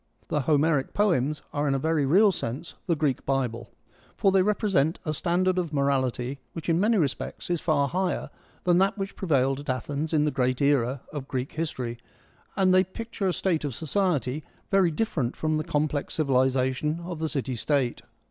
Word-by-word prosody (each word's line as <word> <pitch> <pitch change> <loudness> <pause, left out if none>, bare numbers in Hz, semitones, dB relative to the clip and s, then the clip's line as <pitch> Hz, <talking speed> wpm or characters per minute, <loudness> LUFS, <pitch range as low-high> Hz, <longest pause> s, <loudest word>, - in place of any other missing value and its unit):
The 150 - +1
Homeric 150 0 +2
poems 155 -8 +1
are 145 0 0
in 135 - +2
a - - +2
very 155 0 +1
real 200 +8 +6
sense 150 0 -5
the 170 - +2
Greek 145 -4 0
Bible, 125 -4 -1 0.5
for 195 - +3
they 190 0 +4
represent 190 -6 +1
a 155 - -1
standard 185 +3 +1
of 170 -4 -2
morality 135 -2 0
which 165 0 -5
in 165 0 +3
many 215 +3 +3
respects 150 +1 -2
is 175 - 0
far 145 -4 +2
higher 180 +4 -1 0.3
than 175 0 +4
that 195 +2 +2
which 195 0 -4
prevailed 135 -6 +1
at 145 - -8
Athens 145 +4 -2
in 155 -2 +3
the 150 - +1
great 130 -2 0
era 140 -2 +2
of 140 -3 -5
Greek 130 0 -3
history, 125 -7 -4 0.6
and 190 -2 +3
they 185 0 +6
picture 210 +2 -4
a - - +3
state 170 -5 0
of 140 -5 -3
society 155 - 0 0.3
very 195 -3 +4
different 150 - -1
from 155 0 0
the 155 - -1
complex 150 -1 -1
civilisation 130 +1 +1
of 170 -2 -6
the 160 0 -1
city 135 -4 -2
state. 130 0 0
150 Hz, 185 wpm, -26 LUFS, 135-175 Hz, 0.6 s, real